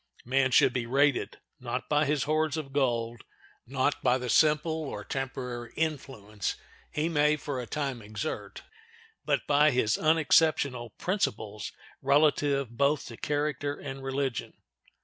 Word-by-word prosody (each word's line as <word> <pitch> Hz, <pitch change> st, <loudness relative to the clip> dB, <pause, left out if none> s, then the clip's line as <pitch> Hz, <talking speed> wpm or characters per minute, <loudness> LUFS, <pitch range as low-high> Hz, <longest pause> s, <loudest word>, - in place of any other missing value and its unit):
Man 130 Hz, +2 st, +2 dB
should 125 Hz, -, +5 dB
be 120 Hz, -2 st, -2 dB
rated, 140 Hz, +2 st, +2 dB, 0.2 s
not -, -, -4 dB
by 150 Hz, 0 st, +2 dB
his 145 Hz, -2 st, +1 dB
hoards 155 Hz, 0 st, 0 dB
of 140 Hz, -4 st, -6 dB
gold, 120 Hz, -4 st, 0 dB, 0.4 s
not 135 Hz, +3 st, 0 dB
by 125 Hz, 0 st, +3 dB
the 125 Hz, -2 st, -3 dB
simple 155 Hz, +1 st, +4 dB, 0.2 s
or -, -, -6 dB
temporary 125 Hz, -3 st, -5 dB
influence 130 Hz, -, -3 dB, 0.4 s
he 150 Hz, +2 st, 0 dB
may 150 Hz, -2 st, +3 dB
for 140 Hz, -3 st, -4 dB
a 120 Hz, -, -8 dB
time 140 Hz, -5 st, -3 dB
exert, 105 Hz, +9 st, -5 dB, 0.6 s
but -, -, 0 dB
by 145 Hz, +1 st, +5 dB
his 125 Hz, -5 st, +2 dB
unexceptionable 155 Hz, -5 st, +3 dB
principles 110 Hz, -, -2 dB, 0.3 s
relative 140 Hz, -3 st, +2 dB
both 140 Hz, +3 st, +2 dB
to 115 Hz, -, -8 dB
character 145 Hz, -1 st, -1 dB
and 135 Hz, -1 st, -7 dB
religion. 135 Hz, -3 st, -2 dB
140 Hz, 135 wpm, -29 LUFS, 125-150 Hz, 0.6 s, should